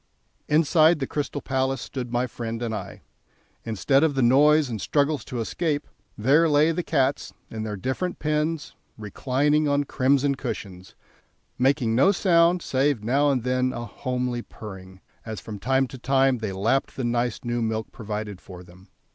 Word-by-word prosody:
Inside 160 +2 +4
the 135 - -2
Crystal 145 +1 -3
Palace 130 -1 0
stood 125 -3 -6
my 120 +1 +1
friend 115 -1 -5
and 115 -2 -2
I. 100 -2 -7 0.6
Instead 125 +6 +2
of 155 -3 +2
the 135 - +2
noise 150 +5 +5
and 110 -5 -5
struggles 145 -2 +1
to 125 - -5
escape, 145 +6 -2 0.3
there 145 +9 +4
lay 150 +2 +4
the 165 - -1
cats 140 -5 0 0.2
in 110 - -5
their 110 -1 -4
different 130 - -3
pens, 155 +1 -1 0.2
reclining 140 +8 0
on 145 0 +2
crimson 140 +1 +2
cushions, 95 -8 -7 0.6
making 130 -3 +2
no 135 +12 +5
sound 175 -2 +3
save 135 -3 0
now 140 +6 +2
and 130 -4 0
then 130 0 0
a 120 - -5
homely 125 0 -3
purring, 95 -5 -11 0.2
as 110 -1 -6
from 105 -2 -8
time 130 +5 +2
to 130 - -10
time 135 0 +2
they 110 -3 -3
lapped 110 +8 0
the 130 - -4
nice 120 0 -1
new 120 0 -2
milk 110 -1 -2
provided 105 -4 -6
for 90 -1 -11
them. 90 +2 -18
130 Hz, 165 wpm, -25 LUFS, 115-145 Hz, 0.6 s, noise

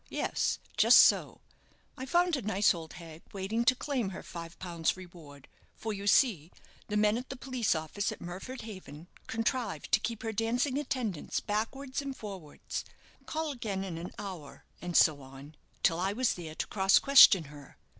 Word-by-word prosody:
Yes, - - -1 0.2
just - - +7
so. - - +2 0.5
I 260 -1 -7
found 350 +3 +3
a 270 - -3
nice 205 -1 +3
old 165 -2 -8
hag 165 -1 -11
waiting 205 +4 -1
to 255 - +5
claim 255 -6 -2
her 190 - -8
five 170 0 -9
pounds 170 -2 -2
reward; 165 -6 -13 0.3
for, 220 -1 -4
you 200 0 -6
see, 190 - +3 0.4
the 210 - -1
men 210 +2 +3
at 255 - -10
the 265 - -5
police 250 -7 -1
office 160 +6 -2
at - - -8
Murford 190 +9 -7
Haven 185 -7 -10 0.2
contrived 225 - -2
to - - +5
keep 230 +1 -4
her 225 -1 -3
dancing 245 +6 0
attendance 245 - -3
backward 260 +7 -3
and 275 -2 -6
forwards 190 -8 -7 0.4
call 315 -1 -2
again 210 -7 -4
in 175 -4 -5
an 175 - -7
hour, 185 -8 -8 0.2
and 175 -1 0
so 150 -3 +5
on 135 +3 -12 0.3
till 165 - +3
I 190 +2 0
was 250 +2 +1
there 160 -3 -8
to - - -2
cross 195 -1 +3
question 265 - +8
her. 145 -2 -14
200 Hz, 175 wpm, -30 LUFS, 170-245 Hz, 0.5 s, question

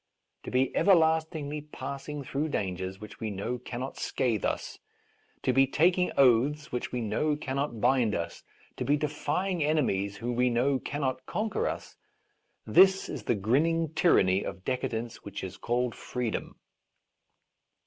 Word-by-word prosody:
To - - -4
be 130 +1 +1
everlastingly 160 -4 +2
pass 140 -1 -7
ing 150 -1 -4
through 140 +4 -2
dangers 95 - -3
which 105 -1 -11
we 110 - -3
know 105 +5 -3
cannot 125 +2 -6
scathe 115 -6 0
us, - - -2 0.6
to - - +2
be 135 0 +5
taking 180 +6 +3
oaths 140 +4 +4
which 125 - -3
we 125 - -2
know 115 +8 0
cannot 140 -4 -3
bind 120 -3 +3
us, 85 - -4 0.4
to - - -2
be 145 +1 +2
defying 150 +5 -1
ene 150 -1 +2
mies 100 +1 -1
who 120 +3 -3
we 125 +1 +2
know 130 +3 +2
cannot 130 -3 -3
conquer 225 - -1
us - - -5 0.4
— - - -47
this 190 0 +6
is 130 -8 -6
the 120 - +2
grinning 155 - +1
tyranny 95 - +4
of 95 -1 -7
decadence 120 -3 -2
which 100 -1 -7
is 95 - -6
called 120 0 -1
freedom. 125 -3 -4
130 Hz, 155 wpm, -29 LUFS, 115-150 Hz, 0.6 s, this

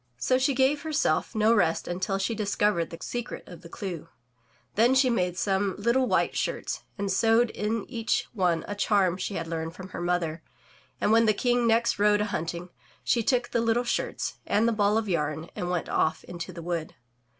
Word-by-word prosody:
So 255 - +2
she 270 +1 +2
gave 270 +3 +2
herself 295 - 0
no 220 +1 +4
rest 170 -7 +1
until 185 +2 -1
she 195 +4 -1
discovered 205 -4 0
the 165 - -8
secret 240 -1 -5
of 175 -1 -11
the 170 - -12
clew. 175 -5 -6 0.6
Then 235 +5 +4
she 260 -1 +4
made 180 -5 0
some 195 -1 0
little 235 +5 +2
white - - +1
shirts - - -2 0.2
and 200 -1 -2
sewed 225 +4 +3
in 210 +1 -2
each 230 -3 -1
one 180 -6 +1
a 205 - -3
charm 200 -3 +2
she 195 +1 -4
had 165 - -3
learned 165 0 -4
from 190 0 -9
her - - -6
mother, 175 -2 -1 0.6
and - - +2
when 225 0 +5
the 215 - +3
King 245 +1 +2
next 230 -1 +2
rode 210 0 +4
a - - +1
himting, 170 -2 -4 0.3
she 235 - +2
took 245 +1 +1
the 235 - 0
little 230 +1 +2
shirts 240 - -2
and 220 +3 +2
the - - +3
ball 210 0 +2
of 225 -1 -1
yam 155 -2 -1
and 175 - -3
went 180 -2 -1
off 160 - 0
into 175 +1 -7
the 170 -1 -9
wood. 170 -2 -3
205 Hz, 200 wpm, -27 LUFS, 175-230 Hz, 0.6 s, when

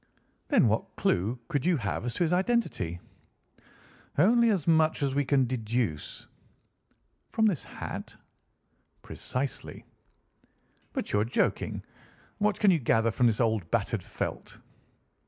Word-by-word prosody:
"Then, - - +4
what - - -1
clue 105 +8 +1
could 145 - -1
you 175 0 +3
have 110 0 -3
as 120 - -3
to 180 - +1
his 170 +1 +1
identity?" 180 - 0 1.2
"Only 230 +9 +5
as 185 -8 0
much 160 -2 +3
as 135 -1 0
we 145 +1 +2
can 135 -1 +3
deduce." 115 - -2 1.0
"From 220 -1 +1
his 175 -9 -2
hat?" - - -7 0.9
"Precisely." 130 +1 -5 1.1
"But - - -4
you 105 - +4
are - - +3
joking. 120 - -1 0.6
What 210 0 +1
can 205 -2 +5
you 170 - +3
gather 115 -2 +2
from 120 +2 +3
this 110 -2 +1
old 110 -8 +1
battered - - 0
felt?" - - -5
135 Hz, 135 wpm, -28 LUFS, 115-180 Hz, 1.2 s, Only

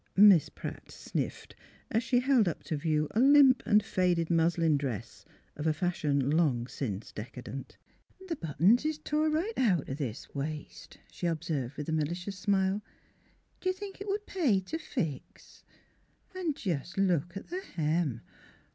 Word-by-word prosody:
Miss 195 -5 +7
Pratt - - -8
sniffed, - - -5 0.4
as 225 - +2
she 245 +1 +2
held 255 -6 +4
up 170 - -3
to 155 - -3
view 155 0 0
a 220 - 0
limp 270 0 +7
and 210 0 +5
faded 175 -2 +1
muslin 165 -1 +3
dress 120 -6 -4 0.3
of 150 +2 -3
a 155 - +3
fashion 150 -5 0
long 145 -7 +2
since 115 -5 -5
decadent. 125 +4 -8 0.2
" 380 0 -18
The 335 - -2
buttons 180 - +3
is 310 0 -1
tore 305 0 0
right 345 +9 -1
out 195 - +2
o* - - -3
this 135 -4 -5
waist," 150 +2 -6
she 175 - -3
observed, 150 -5 -2
with 150 - -5
a - - -2
malicious 175 +5 -2
smile. 195 0 +1 0.4
" - - -38
Do 370 - 0
you - - +2
think 390 +1 -9
it 405 - -5
would 410 +1 -2
pay 290 - +2
t' 250 - -5
fix? 165 - -5 0.4
— - - -36
An' 345 -6 -1
jus' 175 - -3
look 175 -2 +1
at - - -9
the 365 +3 -3
hem! 155 - -1
175 Hz, 170 wpm, -30 LUFS, -, 0.4 s, Miss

